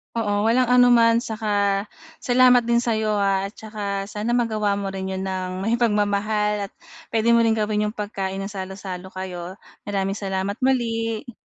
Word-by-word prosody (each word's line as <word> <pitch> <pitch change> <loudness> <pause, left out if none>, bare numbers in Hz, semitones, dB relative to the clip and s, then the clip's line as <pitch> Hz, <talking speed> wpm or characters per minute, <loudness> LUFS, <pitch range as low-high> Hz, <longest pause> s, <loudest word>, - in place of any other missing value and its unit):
Oo, 205 -3 0
walang 240 +3 +3
anuman, 240 -1 +5
saka 205 -2 0 0.3
salamat 250 -1 +4
din 235 0 +2
sa 235 - 0
'yo 215 -1 0
ha. 195 -1 +1
At 200 - -14
tsaka 205 -2 -4
sana 220 +3 -1
magawa 215 -4 +1
mo 200 -1 -3
rin 190 0 -4
'yon 190 0 -3
nang 185 0 -3
may 230 +3 +1
pagmamahal, 210 -1 +1
at - - -26 0.4
puwede 230 0 +1
mo 235 - +5
ring 225 -1 +3
gawin 210 -1 0
yung 210 - -6
pagkain 195 -2 -4
ng 195 - -6
salo-salo 190 -1 -6
kayo. 185 -1 -7 0.3
Maraming 195 0 -1
salamat 195 +1 -3
muli. 230 -3 -1
210 Hz, 170 wpm, -23 LUFS, 195-230 Hz, 0.4 s, anuman